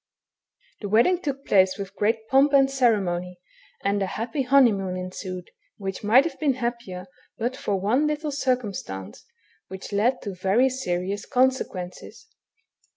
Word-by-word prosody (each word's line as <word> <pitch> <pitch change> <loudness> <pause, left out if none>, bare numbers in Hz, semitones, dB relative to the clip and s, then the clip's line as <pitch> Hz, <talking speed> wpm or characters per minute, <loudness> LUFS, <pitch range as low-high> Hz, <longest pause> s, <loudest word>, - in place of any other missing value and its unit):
The 205 - -5
wedding 245 - +3
took 275 -3 -4
place 190 -1 +3
with 200 0 -7
great 220 +2 0
pomp 270 +4 +4
and 270 -1 +5
cere 245 -5 +3
mony, 180 -1 -4 0.4
and 200 0 +1
a 195 - 0
happy 230 +8 -3
honeymoon 230 -9 +3
ensued, 185 0 -6 0.3
which 195 0 -5
might 230 +6 +6
have 335 - -5
heen 285 -4 +1
happier 235 -7 -4 0.3
hut 245 +3 -2
for 200 -6 -2
one 245 +10 +2
little 300 0 -2
circumstance 225 - -3 0.4
which 190 +2 -8
led 235 +6 +2
to 200 - -4
very 195 +8 +2
serious 195 -5 -3
consequences. 255 - -1
220 Hz, 145 wpm, -25 LUFS, 190-260 Hz, 0.4 s, might